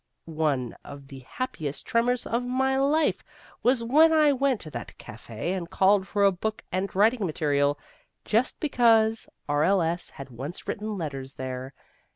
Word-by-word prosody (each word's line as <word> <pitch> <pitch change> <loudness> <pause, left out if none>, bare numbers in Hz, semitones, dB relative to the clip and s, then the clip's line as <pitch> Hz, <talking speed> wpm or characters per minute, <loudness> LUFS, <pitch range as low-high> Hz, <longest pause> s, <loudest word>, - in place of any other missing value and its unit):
One 150 -6 -1
of 140 -1 -11
the 135 - -9
happiest 155 - -4
tremors 245 +1 +1
of 235 +2 -1
my 260 +2 0
life 290 +3 +2 0.4
was 245 -1 +2
when 305 +7 +5
I 305 -2 +5
went 270 -3 +1
to 155 - -8
that 120 -3 -8
café 115 - -6
and 170 -3 -5
called 190 +1 +3
for 200 0 0
a 200 - +6
bock 215 +4 -4
and 190 +2 -1
writing 220 +3 +3
material, 145 -4 +1 0.5
just 230 +4 0
because 225 -6 +3 0.2
R.L.S. 165 +3 +1
had 135 -1 -10
once 135 +9 -7
written 210 0 -3
letters 135 -5 -5
there. 130 +1 -6
195 Hz, 155 wpm, -26 LUFS, 145-245 Hz, 0.5 s, a